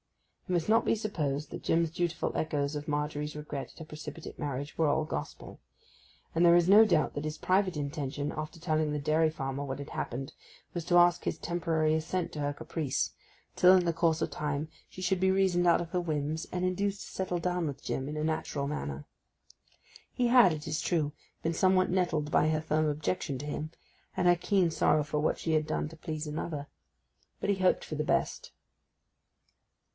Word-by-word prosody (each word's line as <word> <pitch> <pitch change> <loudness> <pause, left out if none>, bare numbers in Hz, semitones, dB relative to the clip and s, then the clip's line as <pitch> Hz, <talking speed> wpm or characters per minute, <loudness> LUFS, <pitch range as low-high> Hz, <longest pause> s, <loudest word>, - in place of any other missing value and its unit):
It - - 0
must 170 -2 +1
not 225 +1 +4
be - - +2
supposed 155 -9 -2
that - - -7
Jim's 165 -1 +2
dutiful 175 0 -2
echoes 145 -1 -1
of 150 +2 -5
Margery's 150 0 -2
regret 150 -2 -5
at - - -17
her 160 - -7
precipitate 155 +1 -8
marriage 145 0 -4
were 160 - +3
all 155 +2 +2
gospel; 75 - -6 0.7
and 165 - +3
there 170 0 +7
is 175 0 +4
no 205 +3 +9
doubt 175 -7 +2
that 145 - -4
his 155 0 -4
private 185 -2 +1
intention, 145 0 -3
after 155 +2 -6
telling 155 -2 0
the 150 - -1
dairy 155 +2 +2
farmer 135 -2 -4
what 135 -1 -4
had 140 - -7
happened, 135 +2 -4 0.4
was 175 - -3
to 175 - +4
ask 175 0 +5
his - - -2
temporary 160 -2 0
assent 165 +3 -1
to 150 - -5
her 145 0 0
caprice, 145 -1 -2 0.4
till, 180 +1 +7
in 180 - +1
the 170 - +1
course 165 -1 +1
of - - -1
time, 150 0 -2 0.2
she 185 - -10
should 185 0 +1
be 190 0 +4
reasoned 185 -2 +2
out 170 - +5
of 170 -1 -6
her 180 - 0
whims 155 -1 -2
and 180 0 -1
induced 200 +2 -1
to - - -8
settle 185 -2 -2
down 180 -1 -1
with 140 -1 -6
Jim 135 +2 -3
in 150 - -4
a 150 - -1
natural 155 -3 -1
manner. 75 - -4 1.1
He 245 - +1
had, 235 -6 +7
it 155 -1 -5
is 155 +1 -1
true, 155 -4 0 0.3
been 165 - 0
somewhat 185 +2 +3
nettled 165 -5 0
by 155 - +4
her 155 -1 +1
firm 155 0 +1
objection 145 -1 -2
to 145 - -6
him, 150 +1 -4 0.5
and 180 -1 +2
her 175 - +7
keen 180 -1 +2
sorrow 150 -1 +3
for 150 0 -2
what 150 - +1
she 160 - -1
had 155 -1 +2
done 155 - -1
to 165 - -12
please 155 -1 -5
another; 150 -1 -4 0.7
but 200 - 0
he 200 - 0
hoped 185 -1 +2
for 155 - -5
the 150 - -1
best. - - -1
155 Hz, 205 wpm, -30 LUFS, 150-175 Hz, 1.1 s, no